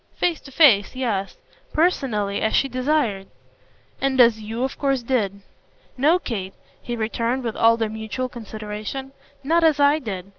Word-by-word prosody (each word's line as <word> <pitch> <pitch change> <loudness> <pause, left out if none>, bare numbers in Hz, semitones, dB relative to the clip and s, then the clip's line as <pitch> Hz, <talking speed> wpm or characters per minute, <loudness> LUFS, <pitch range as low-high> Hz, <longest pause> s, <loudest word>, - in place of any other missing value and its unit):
"Face 345 -3 0
to 275 - -13
face, 255 -8 +5
yes. 215 -7 -2 0.4
Personally, 240 - 0
as 220 - +1
she 275 - +3
desired." 255 -6 0 0.7
"And 270 -1 0
as 230 -3 +6
YOU 225 +3 -4
of 265 - -3
course 275 -3 0
did." 205 -6 -1 0.5
"No, 300 +7 +4
Kate," 200 - -5 0.3
he 240 - -4
returned 230 +3 -1
with 230 -2 -3
all 230 0 +4
their 225 -1 0
mutual 220 +4 -4
consideration; 215 +3 -7 0.3
"not 330 +4 +2
as 310 -3 +4
I 285 +2 +4
did. 195 - -5
240 Hz, 155 wpm, -22 LUFS, 215-275 Hz, 0.7 s, as